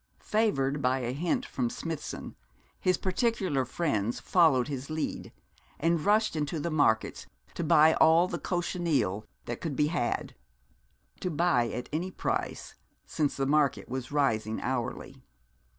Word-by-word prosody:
Favoured 145 Hz, -11 st, 0 dB
by 130 Hz, 0 st, +2 dB
a 120 Hz, 0 st, -2 dB
hint 165 Hz, +5 st, -1 dB
from 125 Hz, -3 st, -2 dB
Smithson, 165 Hz, +4 st, -6 dB, 0.4 s
his 185 Hz, -1 st, +2 dB
particular 185 Hz, -, 0 dB
friends 120 Hz, -6 st, -1 dB
followed 155 Hz, -9 st, +3 dB
his 140 Hz, -1 st, -5 dB
lead, 155 Hz, 0 st, -3 dB, 0.5 s
and 165 Hz, 0 st, +1 dB
rushed 215 Hz, 0 st, +3 dB
into 155 Hz, +1 st, -2 dB
the 170 Hz, +3 st, -2 dB
markets 110 Hz, -8 st, +1 dB, 0.3 s
to -, -, -3 dB
buy 160 Hz, 0 st, +6 dB
all 165 Hz, +3 st, +5 dB
the 170 Hz, -2 st, -4 dB
cochineal 150 Hz, -, -1 dB, 0.2 s
that 120 Hz, -, -5 dB
could 155 Hz, -5 st, -3 dB
be 150 Hz, +2 st, +2 dB
had; 120 Hz, -8 st, -1 dB, 0.9 s
to 180 Hz, -, -2 dB
buy 155 Hz, -8 st, +2 dB
at 125 Hz, -, -5 dB
any 170 Hz, +4 st, -1 dB
price, -, -, -3 dB, 0.3 s
since 150 Hz, -3 st, -1 dB
the 135 Hz, -, 0 dB
market 145 Hz, -1 st, +2 dB
was 130 Hz, +1 st, -4 dB
rising 110 Hz, -7 st, +1 dB
hourly. 125 Hz, +1 st, -3 dB
150 Hz, 140 wpm, -29 LUFS, 130-170 Hz, 0.9 s, buy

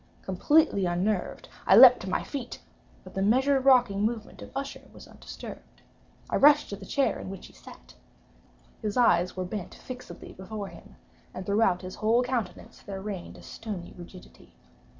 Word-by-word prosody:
Completely 200 Hz, -, +2 dB
unnerved, 190 Hz, -, -2 dB, 0.2 s
I -, -, +7 dB
leaped 250 Hz, -1 st, +10 dB
to 185 Hz, -, -6 dB
my -, -, -1 dB
feet; 270 Hz, -4 st, -6 dB, 0.4 s
but 185 Hz, -, -13 dB
the 195 Hz, -, -2 dB
measured 260 Hz, +6 st, +2 dB
rocking 245 Hz, -7 st, +4 dB
movement 220 Hz, 0 st, -3 dB
of -, -, -9 dB
Usher 275 Hz, 0 st, -6 dB
was -, -, -14 dB
undisturbed. -, -, -11 dB, 0.4 s
I -, -, 0 dB
rushed 295 Hz, +1 st, +5 dB
to -, -, -3 dB
the 195 Hz, -1 st, -12 dB
chair 275 Hz, -, 0 dB
in -, -, -7 dB
which 195 Hz, -1 st, -8 dB
he -, -, -15 dB
sat. 60 Hz, 0 st, -15 dB, 0.9 s
His 210 Hz, 0 st, -3 dB
eyes 180 Hz, -7 st, +3 dB
were 185 Hz, -, -2 dB
bent 185 Hz, 0 st, -6 dB
fixedly 250 Hz, -1 st, -10 dB
before 200 Hz, +1 st, -7 dB
him, 170 Hz, -1 st, -15 dB, 0.4 s
and 185 Hz, -, -6 dB
throughout 200 Hz, -3 st, +2 dB
his 185 Hz, 0 st, -7 dB
whole 230 Hz, +3 st, +2 dB
countenance 245 Hz, -7 st, -4 dB
there 195 Hz, -1 st, -7 dB
reigned 195 Hz, -3 st, -7 dB
a -, -, -14 dB
stony 200 Hz, -6 st, -7 dB
rigidity. 180 Hz, +1 st, -14 dB
205 Hz, 170 wpm, -27 LUFS, 185-250 Hz, 0.9 s, leaped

